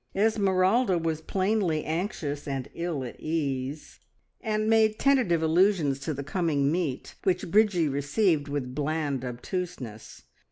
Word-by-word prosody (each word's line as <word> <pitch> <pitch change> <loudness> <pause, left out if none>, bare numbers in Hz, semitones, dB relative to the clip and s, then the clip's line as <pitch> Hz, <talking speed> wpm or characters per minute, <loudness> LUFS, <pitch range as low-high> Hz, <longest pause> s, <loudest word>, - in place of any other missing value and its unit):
Esmeralda 195 0 +3
was 160 -1 -2
plainly 185 -3 0
anxious 155 -4 -3
and 135 -2 -4
ill 170 -5 -3
at 120 - -8
ease, 145 -2 -3 0.4
and 215 -1 -1
made 220 -1 +4
tentative 245 - +3
allusions 160 -4 +3
to 135 +3 -3
the 140 -1 -4
coming 145 -2 0
meet, 160 -6 -2
which 180 -2 0
Bridgie 200 -6 +4
received 145 +3 +1
with 140 -3 -3
bland 145 -2 -1
obtuseness. 125 - -6
160 Hz, 125 wpm, -27 LUFS, 140-195 Hz, 0.4 s, made